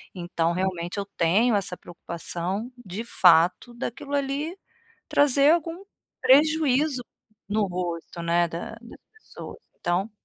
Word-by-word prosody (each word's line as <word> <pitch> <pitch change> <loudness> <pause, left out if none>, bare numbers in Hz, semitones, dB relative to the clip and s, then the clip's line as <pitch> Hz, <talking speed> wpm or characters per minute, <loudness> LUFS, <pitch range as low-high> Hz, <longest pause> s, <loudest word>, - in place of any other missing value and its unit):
Então 170 -2 -1
realmente 180 0 -2
eu 200 - -2
tenho 200 +5 +2
essa 195 -3 -2
preocupação 175 +5 -4
de 195 +2 -6
fato 180 0 +4
daquilo 275 +4 -4
ali 285 +5 -2 0.5
trazer 285 +1 +5
algum 335 +2 -3 0.4
prejuízo 295 -1 +3 0.5
no 210 0 +1
rosto, 175 -2 -5
né, 170 +1 +2
da 170 +5 -6
das 235 - -13 0.2
pessoas. - - -10 0.2
Então 180 +5 0
200 Hz, 115 wpm, -25 LUFS, 175-275 Hz, 0.5 s, trazer